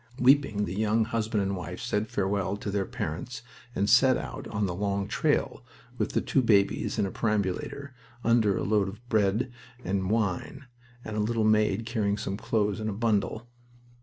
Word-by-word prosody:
Weeping, 125 -5 +4
the 85 - -5
young 110 +1 +2
husband 110 -2 -1
and 100 0 -1
wife 90 -5 -6
said 105 +1 -1
farewell 100 -1 -1
to 100 - -4
their 100 -1 -1
parents 120 - -5 0.3
and 100 - +1
set 125 +4 +5
out - - -6
on 105 -2 -1
the 90 - -2
long 100 +1 -1
trail, - - 0 0.4
with - - -1
the - - +2
two 135 - +2
babies 105 -1 +2
in 100 - +2
a 95 - -3
perambulator, 105 +6 -2 0.3
under 110 -4 +3
a - - -2
load 100 -1 +2
of 115 +5 -12
bread 110 +3 +1 0.3
and 95 -1 -1
wine, 110 +5 -1 0.4
and 110 - -5
a - - +1
little 110 +1 +1
maid 110 0 +2
carrying 105 -4 0
some 95 - -3
clothes 105 -2 0
in 110 0 -2
a - - -2
bundle. 110 +1 0
105 Hz, 180 wpm, -28 LUFS, 100-115 Hz, 0.4 s, set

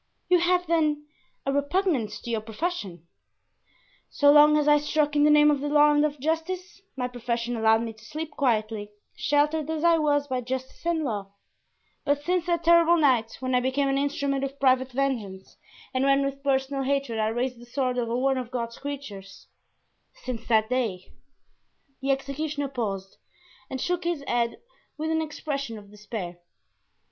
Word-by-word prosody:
"You 360 -1 +5
have, 360 +1 +2
then, 305 -3 +1 0.4
a 275 - +1
repugnance 285 - 0
to 235 - -6
your 225 -2 -1
profession?" 215 - -4 1.0
"So 285 -1 +4
long 300 +1 +7
as 300 -1 +1
I 295 0 +6
struck 295 0 0
in 295 0 +4
the - - +5
name 300 0 +6
of 290 - 0
the 290 - -2
law 295 0 +5
and 295 0 +3
of 300 -1 -1
justice 350 +6 -3 0.2
my 250 -1 -1
profession 240 -1 -3
allowed 225 0 +3
me 225 -1 -5
to 220 0 -19
sleep 310 +7 -6
quietly, 220 -6 -1 0.3
sheltered 300 +1 +1
as 320 0 -2
I 335 -1 +5
was 290 -1 +1
by 255 -2 -2
justice 260 +1 -5
and 330 -2 +1
law; 205 -7 -4 0.7
but 285 0 0
since 355 +1 0
that 340 -1 0
terrible 340 0 +5
night 250 -7 +2
when 255 0 -2
I 250 - +4
became 265 +2 0
an 270 0 +1
instrument 280 -1 -1
of 275 +1 -5
private 260 -1 +3
vengeance 235 -8 -3 0.4
and 260 0 +1
when 275 0 +3
with 275 0 -4
personal 275 0 0
hatred 270 -4 -1
I 215 - +2
raised 240 +2 -2
the 240 - -13
sword 250 0 -1
over 235 0 -1
one 265 +1 +1
of 245 -2 -6
God's 235 -2 -4
creatures—since 245 -1 -10
that 220 -2 +3
day——" 220 -8 -2 0.9
The 270 - -3
executioner 280 +1 -2
paused 200 -7 -4 0.5
and 265 - -4
shook 355 +4 -1
his 340 -5 -1
head 235 -1 0 0.4
with 315 +1 -2
an 320 0 +1
expression 280 -6 -4
of 205 -1 -13
despair. 205 -4 -7
275 Hz, 175 wpm, -26 LUFS, 235-300 Hz, 1.0 s, long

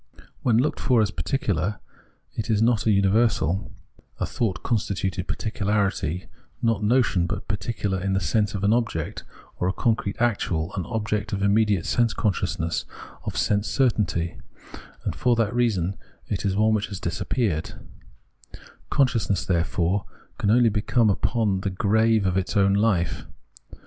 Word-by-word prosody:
When 115 -3 +3
looked 140 +6 +1
for 125 -3 +3
as 100 - -1
particular 95 - -1 0.5
it 110 +1 -4
is 110 -2 +2
not 115 -1 +2
a - - +5
universal, 100 -3 +2 0.5
a - - 0
thought 110 -6 -2
constituted 100 -4 -1
particularity, 100 -5 -1 0.3
not 115 -3 +1
notion, 105 -6 +2
but - - -4
particular 105 -3 -2
in 95 +1 0
the 95 - +2
sense 105 +4 0
of 100 - -4
an 100 +2 +4
object, 115 -10 -2 0.4
or 90 - +1
a - - +2
concrete 110 -3 0
actual, 95 -7 0
an 95 - -3
object 110 -2 -2
of 100 0 -1
immediate 100 -2 +2
sense 120 -2 +1
consciousness, 85 -5 -1 0.4
of - - -4
sense 105 0 +1
certainty; 100 -10 0 0.7
and - - -2
for 120 -1 +2
that 115 -1 0
reason 100 -7 0 0.3
it 100 - -2
is 95 -1 +1
one 110 +2 +3
which 105 -1 0
has 100 -3 -6
disappeared^ 85 -1 -2 1.1
Consciousness, 115 -8 +1
therefore, 90 +2 0 0.3
can 100 - +1
only 120 0 +5
come 115 -1 +3
upon 105 -1 0
the 100 - -1
grave 110 +2 +2
of 95 0 +1
its 95 +3 -1
own 100 0 +4
hfe. 100 -5 +1
105 Hz, 150 wpm, -24 LUFS, 95-115 Hz, 1.1 s, a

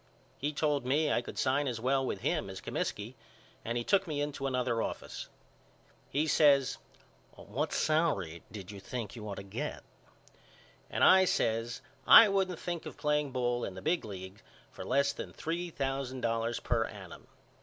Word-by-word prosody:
He 145 +2 -1
told 150 -2 0
me 145 +4 +2
I - - +2
could - - -9
sign 140 +2 +1
as 120 -3 -2
well 135 +3 +1
with 100 -7 -3
him - - 0
as 95 0 -7
Comiskey 105 +5 -3 0.5
and 115 +1 -2
he 120 - -1
took 195 +7 +2
me 150 -3 -2
into 145 -1 -2
another 125 -3 0
office. - - -5 0.8
He 150 +3 +1
says 145 -4 +4 0.6
What 135 +10 -3
salary 145 - +1
did 100 -2 -8
you 100 - -9
think 110 +3 -5
you 105 -2 -7
ought 100 - -4
to - - -7
get? 115 +10 -5 1.1
and - - 0
I 190 0 +8
says 115 -6 0 0.3
I 225 - +10
wouldn't 190 -3 0
think 175 0 -4
of - - -9
playing 150 0 +1
ball 120 -2 -1
in 95 - -4
the 95 - -7
big 165 +2 +1
league 95 -1 -8 0.3
for - - -8
less 140 +2 +2
than - - -7
three 170 +2 -3
thousand 135 -3 -3
dollars 115 0 0
per 115 -2 0
annum. 95 -5 -10
130 Hz, 175 wpm, -31 LUFS, 115-150 Hz, 1.1 s, I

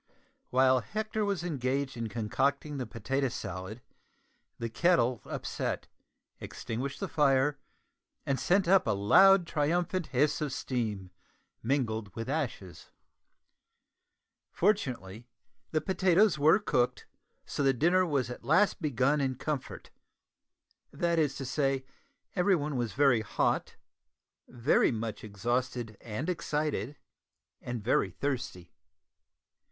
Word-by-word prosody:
While 130 0 +4
Hector 215 - -3
was 200 -4 -1
engaged 135 -4 -2
in 115 -2 -4
concocting 140 +6 -1
the 125 - -4
potato 135 +4 -1
salad 95 +1 -6 0.7
the 115 - -3
kettle 125 -2 +2
upset, - - -3 0.5
extinguished 130 +4 -5
the - - -2
fire, 140 -1 +2 0.7
and 135 -1 0
sent 190 0 +2
up 190 -4 +4
a 110 - +2
loud 190 - +6
triumphant 170 +3 0
hiss 145 +4 +1
of 150 -3 -1
steam 105 -9 -3 0.5
mingled 110 -6 -1
with 115 +2 -5
ashes. 125 - -4 1.6
Fortunately 120 - -1 0.4
the 155 - 0
potatoes 190 0 +3
were 155 +5 +6
cooked, 125 - 0 0.4
so - - -4
the 135 -1 +4
dinner 175 +8 +3
was 140 -8 -1
at - - -8
last 185 +6 +3
begun 145 0 +1
in 130 -1 0
comfort 140 +1 -5 1.0
that 170 -1 0
is 145 -3 +1
to 135 - -5
say, 135 0 0 0.5
everyone 180 -6 +1
was 120 -3 -2
very 135 -5 +4
hot, 110 - -1 0.7
very 125 +3 +2
much 115 -2 -4
exhausted 120 +2 -2
and 120 +6 -5
excited, 150 - -2 0.6
and 120 -3 -5
very 105 -3 +2
thirsty. 125 -7 -4
135 Hz, 115 wpm, -30 LUFS, 120-155 Hz, 1.6 s, loud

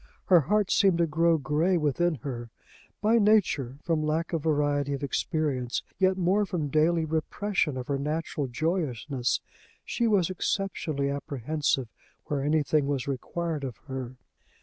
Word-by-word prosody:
Her 180 -2 +6
heart 210 +5 +1
seemed 195 -5 +4
to 170 - +3
grow 165 +1 +3
gray 155 +5 +1
within 160 +2 +1
her. 120 -4 -5 0.5
By 225 +2 +4
nature, 185 - +2
from 165 -3 0
lack 155 +3 -1
of 165 - 0
variety 145 -2 +1
of 140 - -4
experience, 140 -3 -1 0.2
yet 190 0 +3
more 190 +3 +2
from 175 -7 -2
daily 160 +3 +2
repression 160 0 -1
of 125 - -4
her 140 +1 -1
natural 150 0 -2
joyousness, 135 -3 -1 0.4
she 235 - 0
was 190 -5 +2
exceptionally 165 -7 -1
apprehensive 140 -1 -1 0.4
where 145 -2 -1
anything 150 0 +2
was 140 -2 -1
required 155 +3 -3
of 125 -6 -5
her. 130 -2 -5
155 Hz, 145 wpm, -28 LUFS, 140-175 Hz, 0.5 s, Her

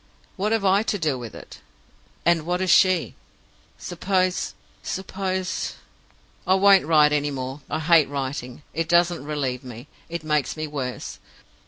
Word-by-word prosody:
What 205 +3 -1
have 225 -3 +1
I 195 +1 +4
to 215 -1 -1
do 155 -6 0
with 120 -3 -8
it, - - -11 0.7
and 170 -1 +4
what 175 +2 -1
has 185 -1 +1
she?' 185 -4 +4 0.6
Suppose 185 +1 -1 0.3
suppose 190 -1 -3 0.7
"I 185 - +5
won't 195 -3 +5
write 150 -2 +5
any 145 0 +1
more. 135 +1 -5
I - - -1
hate 160 -1 +4
writing. 135 -1 -5
It 165 0 -2
doesn't 175 -3 +3
relieve 140 -4 -3
me 120 -2 -9 0.2
it 170 -1 -5
makes 150 -1 0
me 155 - -2
worse. 135 -4 -5
165 Hz, 150 wpm, -24 LUFS, 145-185 Hz, 0.7 s, I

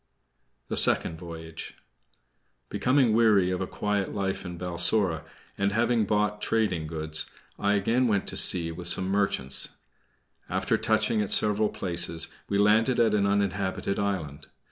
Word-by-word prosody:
THE - - -2
SECOND 80 - +3
VOYAGE 80 -2 -9 0.9
Becoming 130 -3 +2
weary 105 -5 +4
of 90 - -2
a 95 - -2
quiet 105 -2 -2
life 95 -1 -2
in 90 -1 -7
Balsora, 85 0 0 0.4
and 100 0 +1
having 115 0 +2
bought 105 0 0
trading 100 -10 0
goods, 80 0 -3 0.3
I 100 0 +2
again 115 +5 +1
went 100 -3 +1
to - - -5
sea 85 -2 +1
with 85 +1 -6
some 95 +2 +1
merchants. 95 -10 0 0.8
After - - 0
touching 110 -2 +1
at 105 - -3
several 105 0 +3
places, 85 -2 -1 0.2
we 100 - +1
landed 110 +5 +3
at 115 -2 +3
an 100 -1 +2
uninhabited 100 -1 -1
island. 80 -8 -3
100 Hz, 145 wpm, -27 LUFS, 85-105 Hz, 0.9 s, weary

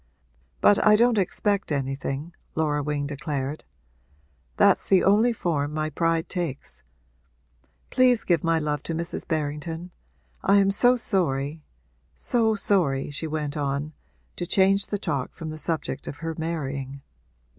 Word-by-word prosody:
But 205 - +5
I 210 0 +7
don't 235 0 +4
expect 200 0 0
anything,' 135 +3 -3 0.2
Laura 150 -2 +1
Wing 145 0 -2
declared. 145 0 -4 0.9
'That's - - +4
the 190 -2 +5
only 215 +5 +4
form 150 -8 -2
my 155 0 -1
pride 165 +1 0
takes. 170 -8 -4 1.1
Please 250 -2 +4
give 170 -4 +1
my 165 -1 +2
love 150 -2 -1
to 165 - -1
Mrs. 170 +1 -4
Berrington. 160 +2 -3 0.5
I 200 - +4
am 195 0 +4
so 245 +5 +5
sorry 155 - 0 0.5
so 220 - +1
sorry,' 160 -10 +1
she 155 +3 -3
went 150 -1 -3
on, 145 +1 -2 0.4
to 175 - -3
change 195 +2 +4
the 205 - -2
talk 145 -9 -3
from 160 -2 -6
the 155 - -7
subject 160 +1 -3
of 145 - -6
her 165 - -2
marrying. 140 -4 -4
160 Hz, 140 wpm, -25 LUFS, 145-195 Hz, 1.1 s, I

